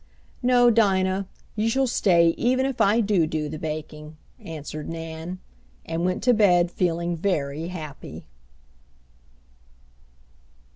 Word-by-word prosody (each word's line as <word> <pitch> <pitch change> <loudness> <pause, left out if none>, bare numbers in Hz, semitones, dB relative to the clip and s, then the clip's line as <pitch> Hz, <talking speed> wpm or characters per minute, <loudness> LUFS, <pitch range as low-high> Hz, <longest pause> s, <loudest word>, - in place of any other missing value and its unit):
"No, 245 -1 +5
Dinah, 195 -3 +2 0.3
you 220 +1 0
shall 265 +3 +2
stay 175 -8 +3
even 255 +9 +1
if 270 -2 -2
I 215 +4 +4
do 195 -7 +2
do 155 -1 -2
the 155 +1 -6
baking," 155 0 -6 0.2
answered 155 -1 -7
Nan; 165 +2 -6 0.5
and 165 +1 -3
went 185 +2 -1
to 250 +1 +5
bed 180 -5 +4
feeling 170 -1 -1
very 160 -3 -2
happy. 160 -5 -8
175 Hz, 115 wpm, -24 LUFS, 160-210 Hz, 0.5 s, No